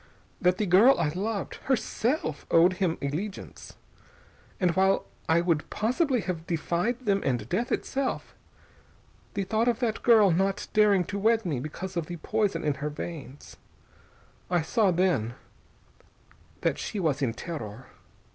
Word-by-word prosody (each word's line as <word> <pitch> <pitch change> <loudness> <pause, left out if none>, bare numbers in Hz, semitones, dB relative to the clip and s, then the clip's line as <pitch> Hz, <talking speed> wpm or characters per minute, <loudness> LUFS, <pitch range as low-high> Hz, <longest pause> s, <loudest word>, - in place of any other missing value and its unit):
That 180 0 +3
the 210 - 0
girl 205 +9 +6
I 165 -3 +1
loved, 200 +5 -3
herself, 245 - -1
owed 175 +3 +5
him 170 -3 +1
allegiance. 175 +9 -5 0.8
And 180 -2 +3
while 190 +2 +2 0.2
I 165 +1 +4
would 170 -3 0
possibly 250 +4 +1
have 170 -4 -4
defied 175 - -1
them 200 -5 +1
and 120 -5 -1
death 230 - -1
itself, 270 -1 -2 1.0
the 200 - 0
thought 220 +4 0
of 240 -2 +2
that 230 -3 -1
girl 220 -5 +6
not 195 +3 0
daring 210 -3 +4
to 200 +3 -4
wed 225 +1 +2
me 150 -8 -1
because 180 +7 -6
of 170 -3 -2
the 175 - -6
poison 205 +5 -1
in 150 - +1
her 150 - -1
veins.... 150 -2 -8 0.9
I 175 -3 +1
saw, 210 +5 +2
then, 170 - +1 1.3
that - - 0
she 210 - -4
was 150 -6 0
in 120 -4 0
terror. 130 - -7
185 Hz, 145 wpm, -27 LUFS, 160-215 Hz, 1.3 s, girl